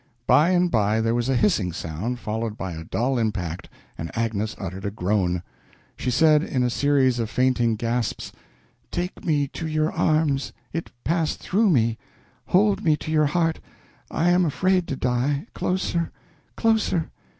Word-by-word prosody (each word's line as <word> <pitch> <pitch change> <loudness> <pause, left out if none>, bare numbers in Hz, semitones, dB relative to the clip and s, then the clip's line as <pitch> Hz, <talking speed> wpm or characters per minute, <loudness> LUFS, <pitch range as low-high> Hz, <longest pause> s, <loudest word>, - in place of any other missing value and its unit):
By 155 +4 +5
and 180 -1 +2
by 105 0 +2
there 115 +1 +1
was 120 +2 0
a 135 - +2
hissing 120 - +2
sound, 90 +10 -4
followed 110 -1 -3
by 95 - -4
a 80 -1 -6
dull 125 +9 0
impact, 95 -6 -3 0.3
and 80 - -4
Agnes 110 -2 -1
uttered 95 0 -6
a 100 - -1
groan. 90 -3 0 0.5
She - - -3
said, 150 +4 +5
in 130 -5 -1
a 125 - +1
series 135 -2 +2
of 115 -2 -1
fainting 120 -1 +2
gasps: 115 +1 -2 0.6
"Take 180 +1 -4
me 145 -4 +1
to 165 - -5
your 155 0 0
arms 155 -3 +1 0.2
it 165 - -3
passed 165 -1 0
through 210 +3 +2
me 115 -7 +2 0.5
hold 200 +2 +3
me 155 -2 +3
to 155 - -6
your 155 -1 +3
heart 165 +1 0 0.5
I 175 +2 +2
am 180 +1 +4
afraid 180 +3 +1
to 135 - -2
die 130 +5 0
closer 175 -2 -1 0.5
closer. 215 -7 +1
130 Hz, 160 wpm, -24 LUFS, 110-160 Hz, 0.6 s, By